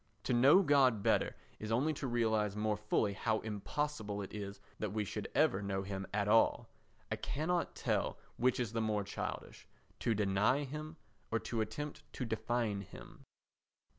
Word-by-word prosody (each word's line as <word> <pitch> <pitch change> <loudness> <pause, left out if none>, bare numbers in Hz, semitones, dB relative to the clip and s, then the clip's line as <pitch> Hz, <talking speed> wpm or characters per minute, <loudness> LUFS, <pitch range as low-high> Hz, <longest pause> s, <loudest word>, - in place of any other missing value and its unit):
To - - 0
know 135 +11 +7
God 135 - +4
better - - +2 0.2
is 105 0 -5
only 140 +7 +2
to 140 -2 -4
realise 110 -4 +1
more 105 0 +1
fully 105 0 +1
how 110 +2 0
impossible 110 -1 -3
it - - -9
is 100 -1 -5 0.2
that 105 -2 -2
we 105 -1 0
should - - -4
ever 95 - +4
know 95 -1 -2
him 95 -1 -4
at 105 0 0
all. 115 +2 +4 0.4
I - - 0
cannot 170 +4 -1
tell - - 0 0.2
which 125 +1 +2
is 120 -3 -1
the 115 - 0
more 105 -2 0
childish—to 110 +2 -5
deny 105 +7 +2
him, 155 +3 -6 0.3
or 115 - +1
to 115 -2 -2
attempt 110 +8 -4
to 125 - -3
define 110 -2 -1
him. 95 - -12
110 Hz, 165 wpm, -35 LUFS, 105-130 Hz, 0.4 s, know